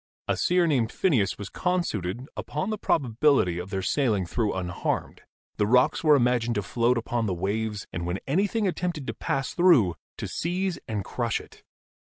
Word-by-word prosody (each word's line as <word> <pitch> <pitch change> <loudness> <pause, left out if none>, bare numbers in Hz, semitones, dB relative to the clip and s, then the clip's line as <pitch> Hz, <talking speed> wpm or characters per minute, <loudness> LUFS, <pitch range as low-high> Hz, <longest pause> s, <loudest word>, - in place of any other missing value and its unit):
A - - +1
seer 180 0 +2
named 125 -8 +1
Phineas 130 - +1
was 100 -1 -7
con 180 0 0
i8 - - -3
GEOLOGY - - -4
suited 105 +7 -4
upon 155 +8 -3
the 215 - -3
probability 125 - +2
of 90 +2 -6
their 95 -1 -3
sailing 110 -9 +1
through 105 +5 -1
un 90 -2 -3
harmed. 90 - -3 0.4
The 105 - +2
rocks 125 +7 +3
were 155 -2 +6
imagined 120 -2 +2
to 105 - -1
float 120 +5 +1
upon 115 0 -1
the 95 - -1
waves, 105 +3 -2
and, 85 +1 -3
when 90 +2 -1
anything 200 - +1
attempted 170 -4 -2
to - - -3
pass 135 -1 -2
through, 160 - +5 0.2
to - - -4
seize 180 +1 -2
and 105 -4 -3
crush 120 -3 -1
it. - - -15
120 Hz, 195 wpm, -26 LUFS, 100-160 Hz, 0.4 s, were